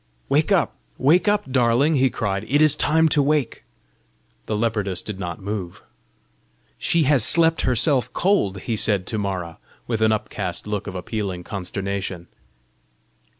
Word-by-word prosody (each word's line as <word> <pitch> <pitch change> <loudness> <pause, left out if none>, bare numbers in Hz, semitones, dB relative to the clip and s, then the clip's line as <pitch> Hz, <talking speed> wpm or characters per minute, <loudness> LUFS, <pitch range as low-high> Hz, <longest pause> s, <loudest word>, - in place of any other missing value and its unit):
"Wake - - +2
up, - - +2 0.2
wake 170 +9 +3
up, 205 -9 +1
darling!" 125 +4 +3
he 135 -2 +3
cried; 100 -4 -2
"it 145 +3 +3
is 155 -1 +5
time 160 +2 +3
to 150 -1 +3
wake!" 145 -2 0 0.8
The 110 - -1
leopardess 105 -4 -1
did 105 -3 -6
not 85 -3 -5
move. 100 -3 -6 1.0
"She 170 -1 +2
has 135 -4 +3
slept 165 +3 +3
herself 130 +1 +2
cold!" 105 - +1
he 115 - -2
said 100 -3 +1
to 110 - -3
Mara, 90 -5 -4 0.3
with 115 -2 -2
an 110 0 +4
upcast 100 -3 -3
look 105 -1 -4
of 95 - -6
appealing 95 -1 -4
consternation. 95 -1 -5
110 Hz, 150 wpm, -22 LUFS, 95-145 Hz, 1.0 s, is